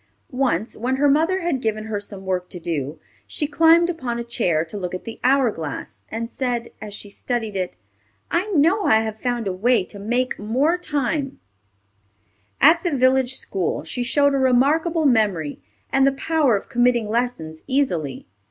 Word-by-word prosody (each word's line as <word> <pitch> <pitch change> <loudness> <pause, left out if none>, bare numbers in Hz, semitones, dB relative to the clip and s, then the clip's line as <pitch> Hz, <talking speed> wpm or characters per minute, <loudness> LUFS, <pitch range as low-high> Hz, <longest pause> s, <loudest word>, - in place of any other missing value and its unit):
Once, 245 -6 0
when 250 +4 -1
her 285 +2 +3
mother 325 +7 +2
had 335 -7 -1
given 215 -2 -1
her 215 -2 -3
some 200 -1 -8
work 180 -1 -2
to 180 - -7
do, 155 -3 -3 0.3
she 300 - -2
climbed 330 +3 +5
upon 255 -9 -3
a 235 - -3
chair 180 -9 0
to 165 - -9
look 185 -3 -4
at 185 - -7
the 230 - -8
hour 260 -2 +4
glass, 155 -7 -6
and 230 +1 -4
said, 245 -1 -3
as 210 -1 -7
she 205 - -9
studied 220 0 -3
it, 185 -2 -2 0.6
"I 350 +5 +1
know 365 +3 +3
I 220 0 +5
have 220 -1 -4
found 245 -2 -2
a 190 - -1
way 220 +3 +2
to 200 +2 -9
make 245 +5 -1
more 260 +11 +1
time." 290 -4 -2 1.2
At 330 +3 +6
the 355 - 0
village 260 0 +3
school 190 -8 -2
she 165 +10 -4
showed 285 +3 +3
a 275 - +1
remarkable 300 +6 +2
memory 205 - +1 0.3
and 270 0 +4
the - - +4
power 290 -3 +2
of 200 - -4
committing 240 -2 +2
lessons 210 -9 -2
easily. 180 - -1
245 Hz, 180 wpm, -22 LUFS, 205-280 Hz, 1.2 s, At